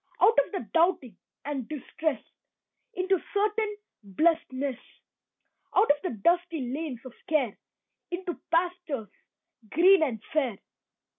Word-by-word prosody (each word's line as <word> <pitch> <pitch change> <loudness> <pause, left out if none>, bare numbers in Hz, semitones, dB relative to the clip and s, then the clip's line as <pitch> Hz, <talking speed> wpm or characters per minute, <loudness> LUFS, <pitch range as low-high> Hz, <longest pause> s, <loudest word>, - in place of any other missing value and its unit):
Out 455 - +6
of - - -14
the 375 - -4
doubting 330 - +2 0.3
and 280 -4 -4
distress 305 -2 -3 0.7
Into 370 0 +1
certain 420 +1 +1 0.2
blessedness. 265 - 0 1.0
Out 405 - +6
of 290 0 +1
the 365 - -2
dusty 335 -7 +1
lanes 285 -5 -4
of 255 - -9 0.2
care 275 -9 +1 0.5
Into 355 0 -3 0.2
pastures 335 - 0 0.6
green 370 - +6
and 255 -8 0
fair. 265 -9 +1
315 Hz, 115 wpm, -28 LUFS, 260-360 Hz, 1.0 s, Out